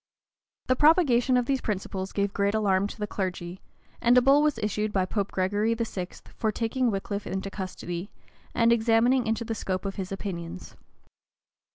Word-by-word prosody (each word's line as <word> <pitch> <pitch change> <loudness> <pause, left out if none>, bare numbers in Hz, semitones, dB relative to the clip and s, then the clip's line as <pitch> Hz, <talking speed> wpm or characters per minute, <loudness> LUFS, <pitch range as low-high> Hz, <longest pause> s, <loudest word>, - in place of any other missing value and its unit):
The 255 - +2
propagation 270 -5 +4
of 245 - +1
these 270 +1 0
principles 195 -2 -3
gave 200 -1 -1
great 200 +1 +1
alarm 200 -2 +2
to - - -9
the 210 - -2
clergy; 185 -3 -4 0.4
and 240 +1 +5
a - - +7
bull 275 +3 +6
was 300 -1 +2
issued 210 0 -1
by 190 -2 +1
Pope 200 +1 -2
Gregory 205 +4 +1
XI. 205 -6 -3 0.3
for 220 - 0
taking 235 +3 0
Wickliffe 200 0 -3
into 190 +1 -4
custody, 185 -1 -5 0.5
and 230 -1 +4
examining 235 +2 +3
into 225 +1 -1
the 225 - -2
scope 190 -3 -3
of 195 - -4
his 190 -1 -4
opinions. 170 - -6
210 Hz, 170 wpm, -27 LUFS, 190-235 Hz, 0.5 s, a